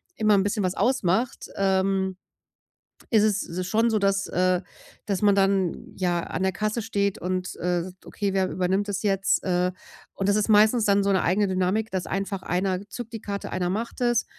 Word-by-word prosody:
immer 215 -1 +3
'n 195 - +3
bisschen 205 +1 -1
was 185 0 -1
ausmacht, 235 -2 0
ähm, 190 -1 +1 0.9
ist 220 -3 +4
es 185 -4 -1
schon 225 +4 +2
so, 220 -1 +1
dass 195 0 +1
äh, 180 0 +1 0.5
dass 200 -3 -1
man 205 -1 +4
dann 195 -2 0
ja 175 -2 0
an - - -5
der 190 0 +1
Kasse 215 +4 -1
steht 200 -3 -1
und, 185 0 -3
äh: 180 +1 -1
„Okay, 200 -2 -3
wer 190 -1 +1
übernimmt 190 +3 0
das 200 0 -3
jetzt, 195 -1 +1
äh“, 180 -1 +1 0.4
und 195 0 -1
das 205 - +3
ist 210 - +1
meistens 215 +2 +5
dann 200 0 +3
so 200 - +2
'ne 190 - +2
eigene 200 +4 +2
Dynamik, 190 +4 0
dass 185 -2 -2
einfach 195 -1 -3
einer 185 +2 -1
zückt 235 0 -7
die 225 - -5
Karte. 200 -1 -5
Einer 180 -1 -1
macht 220 +5 -3
es 240 -1 +2
195 Hz, 190 wpm, -25 LUFS, 185-210 Hz, 0.9 s, meistens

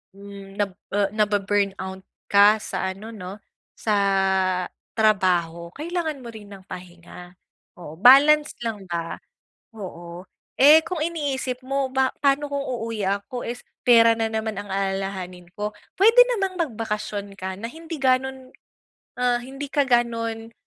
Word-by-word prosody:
hmm, 200 -1 -11
nag, 205 -1 -1 0.2
eh, 200 -1 +2
na-bu-burnout 200 -2 0 0.3
ka 205 +1 +7
sa 190 0 -3
ano, 220 +4 -10
'no, 200 -1 -9 0.3
sa 215 -2 0 1.0
trabaho, 180 -6 +2
kailangan 315 -3 -3
mo 235 - -8
rin 215 -2 -11
ng 195 -2 -12
pahinga. 180 -1 -11 0.4
Oo, 160 -2 -11
balance 295 +6 +6
lang 210 -5 -4
ba. 170 -1 -4 0.6
Oo. 175 -3 -8 0.3
Eh, 295 +4 +8
kung 345 -3 -3
iniisip 270 -6 -3
mo 275 0 -1
ba 265 0 +1
paano 280 +1 +3
kung 280 -1 -3
uuwi 230 -4 -4
ako 200 +5 -2
is 240 +1 -6 0.2
pera 230 -2 +6
na 225 -1 -1
naman 220 0 -2
ang 205 0 -7
alalahanin 195 -2 -3
ko? 210 0 -3 0.2
Puwede 455 +5 +8 0.2
namang 385 -1 -1
magbakasyon 215 - -3
ka 190 0 -5
na 225 - -5
hindi 325 +4 -8
gano'n, 260 0 0 0.6
ah, 245 -1 +2
hindi 270 +3 -7
ka 290 - +3
gano'n, 230 -2 0
220 Hz, 135 wpm, -23 LUFS, 195-265 Hz, 1.0 s, Eh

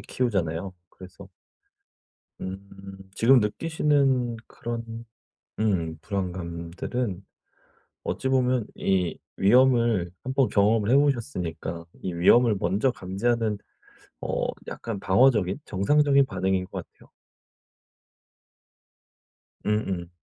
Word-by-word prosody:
키우잖아요. 95 -7 -2 0.2
그래서 95 -1 -13 1.1
음 95 +1 -8 0.2
지금 125 +5 +5
느끼시는 135 0 +1
그런 115 0 -6 0.5
음 85 -7 0
불안감들은 95 +2 -4 0.8
어찌 130 - -2
보면 125 -3 +2
이 90 -3 0 0.2
위험을 115 -4 +4
1 130 0 -3
번 135 -3 +3
경험을 105 +1 +3
해 - - +6
보셨으니까 90 - -1 0.2
이 95 - -3
위험을 110 +6 +5
먼저 105 +9 +1
감지하는 110 +2 -1 0.6
어 - - -1 0.2
약간 110 -4 -5
방어적인 100 -1 +3
정상적인 140 +7 +3
반응인 95 -3 -1
거 - - -6
같아요. - - -22 2.6
음음. 95 -5 -1
105 Hz, 210 characters per minute, -26 LUFS, 95-125 Hz, 2.6 s, 해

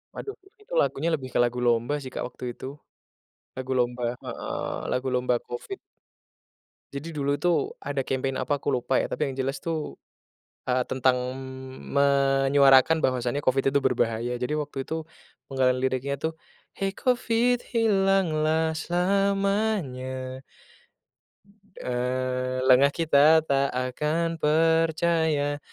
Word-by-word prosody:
Aduh, 410 - -6 0.3
itu - - -12
lagunya 160 +5 0
lebih 135 -5 -3
ke - - +1
lagu 120 +1 -1
lomba 120 +3 +2
sih 130 -2 -8
Kak - - -3
waktu 125 - -14
itu. - - -9 0.9
Lagu 130 0 -4
lomba 125 0 0 0.2
heeh, - - -4 0.2
lagu 125 +1 -1
lomba 125 0 +1
Covid. 120 - -6 1.2
Jadi 150 +4 -6
dulu 145 -2 0
tuh 160 0 0
ada 140 0 -2
campaign 135 0 -2
apa 145 - 0
aku - - 0
lupa 130 0 0
ya, - - 0
tapi - - -1
yang 135 - -5
jelas 135 +1 -2
tuh, 160 -2 -4 0.7
eee, 125 0 +2
tentang, 130 -1 +2 0.2
mmm, 130 0 -9 0.6
menyuarakan 140 +3 +5
bahwasanya 125 +2 0
Covid 135 +1 +1
itu 140 - +4
berbahaya, 120 0 0
jadi 125 +4 -2
waktu 145 -3 -4
itu 160 0 -3 0.5
penggalan 130 -1 +1
liriknya 130 +1 -1
tuh, 160 +3 -4 0.4
"Hei 195 0 -1
Covid 245 0 +1 0.2
hilanglah 190 -8 +2
selamanya" 180 -9 0 1.4
eee, 130 +1 -2
"lengah 135 +2 +6
kita 160 0 +5
tak 140 0 +2
akan 150 +6 -1
percaya. 160 -1 +2
140 Hz, 125 wpm, -26 LUFS, 130-160 Hz, 1.4 s, lengah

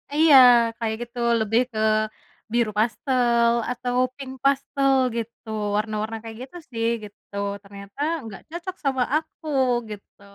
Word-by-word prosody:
Iya, 310 -2 +6 0.4
kayak 220 -1 -1
gitu. 240 +1 -8 0.2
Lebih 220 +3 +2
ke 215 - -4 0.7
biru 235 -3 +2
pastel 235 0 +2 0.2
atau 245 0 -3 0.2
pink 265 -2 -8
pastel 275 0 +2 0.3
gitu, 230 0 -7 0.3
warna-warna 215 +1 -2
kayak 225 -1 -8
gitu 315 +7 -11
sih 230 0 -1 0.2
gitu. 205 0 -13 0.3
Ternyata 200 +4 -13 0.2
nggak 215 -4 -9
cocok 350 +3 -6
sama 265 -2 +1
aku 315 0 -4 0.4
gitu. 205 -1 -11
235 Hz, 130 wpm, -24 LUFS, 220-270 Hz, 0.7 s, Iya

